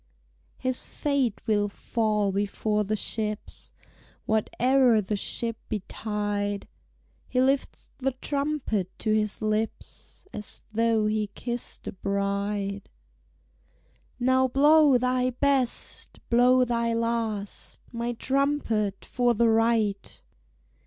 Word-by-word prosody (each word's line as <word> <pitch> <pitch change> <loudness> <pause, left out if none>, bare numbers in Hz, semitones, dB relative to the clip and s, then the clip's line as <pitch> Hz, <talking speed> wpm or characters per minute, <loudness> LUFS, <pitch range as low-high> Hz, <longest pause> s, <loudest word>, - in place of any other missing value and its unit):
His 255 -1 0
fate 275 -7 0
will 205 -1 +2
fall 210 -1 0
before 205 +2 0
the 215 +2 -1
ship's, 215 0 -4 0.5
Whate'er 245 +2 +3
the 210 +1 -2
ship 230 +3 -2
betide; 205 0 -3 0.6
He 250 - 0
lifts 265 +1 0
the 270 0 0
trumpet 280 - -2
to 215 - 0
his 215 0 -1
lips 215 - -3
As 210 -1 -7
though 225 -1 +2
he 215 0 0
kissed 240 0 -5
a - - -2
bride. 200 +1 -2 1.3
"Now 260 +1 +3
blow 290 +1 +5
thy 255 +1 +1
best, 260 -1 -1
blow 250 +2 +5
thy 235 -1 0
last, 230 -3 -3
My 235 0 -2
trumpet, 250 -6 0
for 245 -1 +1
the 230 +1 +4
Right!" 225 -3 +1
225 Hz, 105 wpm, -27 LUFS, 210-255 Hz, 1.3 s, blow